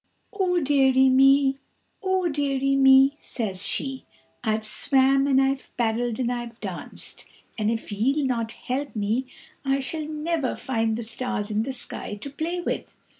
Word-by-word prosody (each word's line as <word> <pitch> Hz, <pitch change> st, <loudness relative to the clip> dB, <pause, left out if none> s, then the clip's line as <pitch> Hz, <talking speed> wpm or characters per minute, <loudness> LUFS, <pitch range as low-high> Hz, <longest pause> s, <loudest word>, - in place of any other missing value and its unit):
"Oh 370 Hz, -3 st, +1 dB
dearie 265 Hz, -3 st, +4 dB
me, 270 Hz, +1 st, +5 dB, 0.4 s
oh 375 Hz, -2 st, +1 dB
dearie 275 Hz, -3 st, 0 dB
me," 270 Hz, 0 st, +6 dB
says 200 Hz, -7 st, -1 dB
she, 270 Hz, -1 st, -2 dB, 0.4 s
"I've 220 Hz, -1 st, 0 dB
swam 270 Hz, +4 st, +3 dB
and 270 Hz, -1 st, +4 dB
I've 270 Hz, 0 st, 0 dB
paddled 235 Hz, 0 st, 0 dB
and 245 Hz, -2 st, -1 dB
I've 240 Hz, -2 st, -5 dB
danced, -, -, -6 dB, 0.3 s
and 215 Hz, -1 st, 0 dB
if 225 Hz, -1 st, -3 dB
ye'll 270 Hz, +8 st, +1 dB
not 230 Hz, -3 st, -1 dB
help 275 Hz, +2 st, -4 dB
me 220 Hz, +5 st, -1 dB, 0.4 s
I 270 Hz, 0 st, +1 dB
shall 300 Hz, +3 st, -3 dB
never 310 Hz, -2 st, -2 dB
find 225 Hz, -3 st, -1 dB
the 235 Hz, -, -4 dB
stars 225 Hz, -2 st, -3 dB
in 210 Hz, +1 st, +1 dB
the 260 Hz, +4 st, -3 dB
sky 245 Hz, -4 st, -4 dB
to 245 Hz, +7 st, -8 dB
play 330 Hz, +5 st, -3 dB
with." -, -, -4 dB
265 Hz, 155 wpm, -25 LUFS, 230-280 Hz, 0.4 s, me